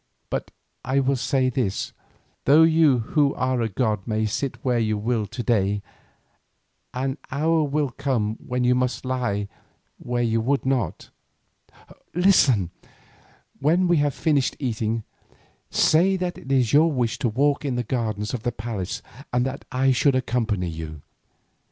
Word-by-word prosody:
But - - -2 0.3
I 135 +2 +1
will 135 0 +2
say 130 0 +1
this: 115 -6 -2 0.5
though 150 +4 +7
you 160 -4 +5 0.2
who 145 -3 +3
are 130 -1 0
a 115 - 0
god 105 -1 -1
may 110 -1 0
sit 120 +5 -2
where 125 -2 +2
you 110 -2 0
will 110 0 -1
to 120 +4 -5
day, 100 -3 +1 1.1
an 130 +1 -3
hour 155 +2 +1
shall 145 -1 +1
come 115 -5 -1
when 125 0 -2
you 125 0 +4
must 125 +1 -1
lie 120 -6 -1 0.5
where 120 0 -1
you 115 -1 +1
would 135 +4 0
not. 125 -10 -1 1.0
Listen: 140 - +4 0.9
when 170 +6 +3
we 175 -1 +3
have 145 -1 +1
finished 145 -5 +1
eating, 115 -3 -2 0.7
say 180 +5 +3
that 180 -1 -2
it 135 - -8
is 130 -4 +2
your 160 +3 +5
wish 120 -5 -1
to 120 - +1
walk 140 +6 +1
in 135 -4 -1
the 125 - -1
gardens 110 -2 -2
of 125 - -3
the 120 +1 -1
palace 110 -2 -5 0.3
and 125 0 +1
that 135 +1 -5
I 130 +1 +2
should 135 +1 +3
accompany 115 -7 0
you. 80 -2 -7
125 Hz, 155 wpm, -24 LUFS, 110-140 Hz, 1.1 s, though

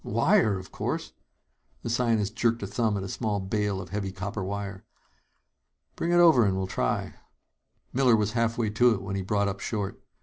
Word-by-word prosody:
"Wire, 115 - +3
of 95 0 -10
course!" - - -3 0.7
The - - -3
scientist 115 -4 +1
jerked 115 -2 +1
a - - -1
thumb 105 +1 0
at 95 - -3
a - - -4
small 105 +1 -2
bale 100 0 -1
of 90 -2 -8
heavy 100 0 -3
copper 100 +2 -4
wire. 100 0 -5 1.1
"Bring 170 - -2
it - - +3
over 165 -8 +6
and 95 -2 +1
we'll 95 - -1
try 95 - -1
it." - - -11 0.8
Miller 125 -3 +4
was 105 -1 +1
halfway 115 -1 0
to 120 +2 +4
it 95 - -7
when 100 0 -4
he 100 - -1
brought 100 +2 0
up 100 0 -3
short. 100 -3 -4
105 Hz, 195 wpm, -27 LUFS, 100-115 Hz, 1.1 s, over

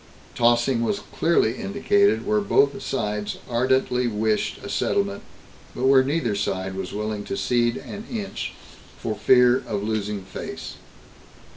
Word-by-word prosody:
3. 120 - -1
Tossing 120 +1 +2
was 200 - -1
clearly 145 -8 +2
indicated 405 - +2
where 215 0 +2
both 145 -8 +2
sides 105 -4 -2
ardently 125 0 +1
wished 110 -1 0
a - - -6
settlement, 100 0 0 0.5
but 125 - -4
where 135 0 +6
neither 135 -5 0
side 95 -2 -2
was 95 -1 -5
willing 105 0 -3
to 100 - -4
cede 120 -1 +1
an 210 +3 -8
inch, 215 -5 -4 0.4
for - - -3
fear 125 -1 +5
of 100 -1 -2
losing 105 -2 -2
"face." 95 - -7
120 Hz, 140 wpm, -24 LUFS, 105-135 Hz, 0.5 s, where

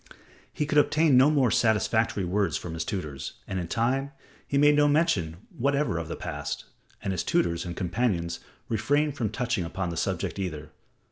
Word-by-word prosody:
He 150 - -2
could 150 0 +3
obtain 155 -1 +4
no 130 +3 +7
more 135 -6 +3
satisfactory 110 -2 +2
words 100 +3 0
from 85 - -6
his 80 -1 -2
tutors, 75 - -5
and 95 - -2
in 85 - -4
time 130 - 0 0.3
he 140 - 0
made 145 +1 +6
no 145 0 +5
mention 105 - +1 0.2
whatever 140 - +1
of 80 - -5
the - - -4
past, - - -5 0.4
and 95 - -1
his 90 - -1
tutors 85 0 +1
and 85 -1 -6
companions 90 -3 -1 0.3
refrained 145 +6 +1
from 115 -6 -1
touching 120 -2 -1
upon 85 +1 -3
the 85 - -5
subject - - -2
either. 75 -6 -4
110 Hz, 180 wpm, -27 LUFS, 85-140 Hz, 0.4 s, no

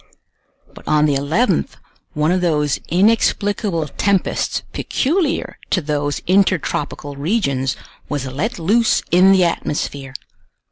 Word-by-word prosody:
But - - -15
on 150 0 +3
the 150 - +2
11th 160 - 0 0.4
one 150 +2 +1
of 185 0 +1
those 150 -5 +1
inexplicable 200 -2 +1
tempests 195 +6 0
peculiar 320 +2 -1
to - - +2
those 145 -5 -2
intertropical 165 -6 0
regions 140 - -1 0.3
was 145 -2 -2
let 145 - -3
loose 215 +8 +2
in 185 +2 +6
the 190 -1 +5
atmosphere. 140 -5 -2
165 Hz, 110 wpm, -19 LUFS, 145-200 Hz, 0.4 s, in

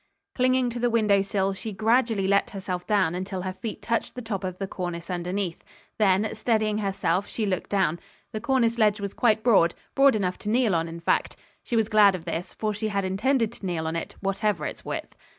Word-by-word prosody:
Clinging 255 -1 +2
to 240 - -5
the 240 0 +2
window 210 -4 +3
sill, 195 0 0
she 215 +3 -6
gradually 225 0 +2
let 200 0 +3
herself 185 -3 -5
down 200 -6 +2
until 185 0 -4
her 185 0 -3
feet 215 +3 -7
touched 230 -1 -1
the 250 - -5
top 205 -4 -3
of 185 -1 -4
the 195 - -3
cornice 175 -2 -5
underneath. 180 0 -3 0.4
Then, 205 +1 +3
steadying 215 -2 0
herself 195 -2 0
she 220 - -2
looked 185 -3 -2
down. 185 -5 +1 0.3
The 215 - -4
cornice 245 -4 +1
ledge 210 -1 +3
was 200 -1 -4
quite 220 -2 +2
broad; 195 -8 +4 0.2
broad 275 -2 +5
enough 185 -3 -1
to 210 - -4
kneel 230 -2 +2
on, 165 0 +1
in 165 0 -8
fact. - - +1 0.3
She 240 - -3
was 225 -2 +2
glad 210 -3 +5
of 170 - -8
this, 170 +2 -4
for 215 -1 -1
she 215 +1 -2
had 200 -2 -1
intended 225 +5 +1
to 235 - -15
kneel 165 -3 -2
on 160 +1 -2
it, 165 - -4
whatever 195 -4 0
its - - -6
width. - - -5
200 Hz, 215 wpm, -26 LUFS, 185-225 Hz, 0.4 s, broad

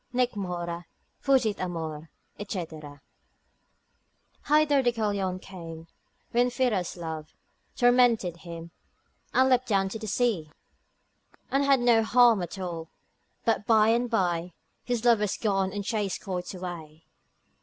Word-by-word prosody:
Nec 250 -1 +1
mora, 175 -3 -4 0.3
fugit 255 -7 +2
amor, 160 -3 -4 0.4
&c.——— - - -2 1.9
Hither 295 -2 +4
Deucalion 205 -6 0
came, 165 -4 -9 0.5
when 245 +1 +3
Pyrrha's 235 -9 -1
love 160 -2 -6 0.4
Tormented 245 -8 +3
him, 170 -1 -9 0.6
and 260 0 +4
leapt 255 -1 +3
down 195 -3 +2
to 220 - -6
the 220 - -6
sea, 205 -8 0 1.0
And 275 +1 +2
had 275 -2 +4
no 235 -2 +5
harm 235 -2 +5
at 175 +2 -5
all, 170 -3 -5 0.6
but 225 -2 +1
by 220 -1 +5
and 240 +2 +2
by 175 -5 0 0.3
His 245 -1 -2
love 235 -3 +5
was 210 -2 -1
gone 195 -3 0
and 200 0 -4
chased 210 -4 -2
quite 180 -3 -4
away. 165 -3 -8
200 Hz, 125 wpm, -27 LUFS, 175-240 Hz, 1.9 s, no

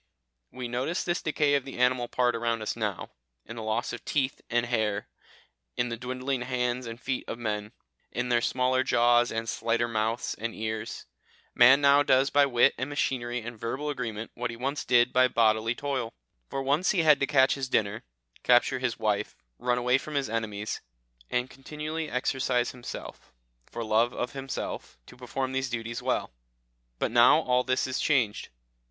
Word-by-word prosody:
We 125 -1 -6
notice 125 +8 -2
this 175 0 -1
decay 150 -2 +1
of 140 -2 +2
the 135 - -9
animal 125 -1 +2
part 125 -1 +1
around 115 -1 -1
us - - -2
now, 105 -5 -3 0.3
in 115 - -8
the 115 - -6
loss 110 +3 -2
of - - -7
teeth 135 -3 -1
and 120 0 +1
hair, 110 -4 -1 0.7
in 120 - 0
the 115 - -3
dwindling 130 +2 -3
hands 125 0 -1
and 115 0 -7
feet 130 0 -2
of - - -4
men, 105 -2 -3 0.4
in 125 +2 -2
their 120 -1 +3
smaller 130 +1 +1
jaws, 120 -1 +3
and 115 0 -3
slighter 115 +1 0
mouths 110 +1 -1
and 115 0 -3
ears. 110 0 -4 0.5
Man 130 +4 +7
now 140 0 +6
does 135 -1 +3
by 145 -1 +5
wit 120 -3 +4
and 130 +2 -2
machinery 125 -4 -1
and 115 0 -8
verbal 135 +7 -3
agreement 115 -5 -5
what 125 0 -3
he 115 - -6
once 140 +4 -2
did 120 -1 +4
by 130 0 +5
bodily 115 -1 +2
toil; 130 -5 -3 0.3
for 135 - -3
once 145 +7 +2
he 180 -5 +2
had 150 -2 +6
to 140 - +1
catch 135 -2 +4
his 135 -2 -4
dinner, 105 -3 0 0.4
capture 125 +1 +4
his 125 -2 -1
wife, 105 -2 -1 0.2
run 125 0 +1
away 125 +2 +2
from 150 +1 -7
his 135 -6 -1
enemies, 110 -2 -3 0.5
and 125 +1 -1
continually 150 +3 -5
exercise 125 -1 0
himself, 125 -1 -9 0.4
for 115 - -5
love 115 +2 +2
of 125 - -3
himself, 135 - -5
to - - -14
perform 130 +1 -3
these 130 -1 -1
duties 115 -1 -4
well. - - -1 0.7
But - - -1
now - - +6
all 125 0 +2
this 130 0 +1
is 130 0 -2
changed. 125 -9 +1
125 Hz, 180 wpm, -28 LUFS, 115-130 Hz, 0.7 s, Man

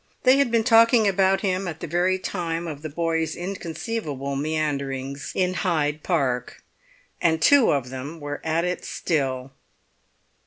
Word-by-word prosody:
They 255 +1 +6
had 280 -3 +3
been 230 -1 +2
talking 230 -1 +5
about 195 0 +2
him 190 -1 -1
at 160 -2 -5
the - - -5
very 175 +3 +1
time 170 -3 -3
of 150 -3 -6
the 155 - -5
boy's 165 0 -1
inconceivable 170 - -4
meanderings 140 -2 -2
in 185 -1 +1
Hyde 155 -5 0
Park. 130 -9 -1 0.6
And 160 -1 +2
two 280 - +5
of 130 -3 -1
them 140 +5 -7
were 145 -1 -5
at 165 +2 0
it 180 0 -2
still. 135 -5 -2
165 Hz, 150 wpm, -24 LUFS, 145-185 Hz, 0.6 s, They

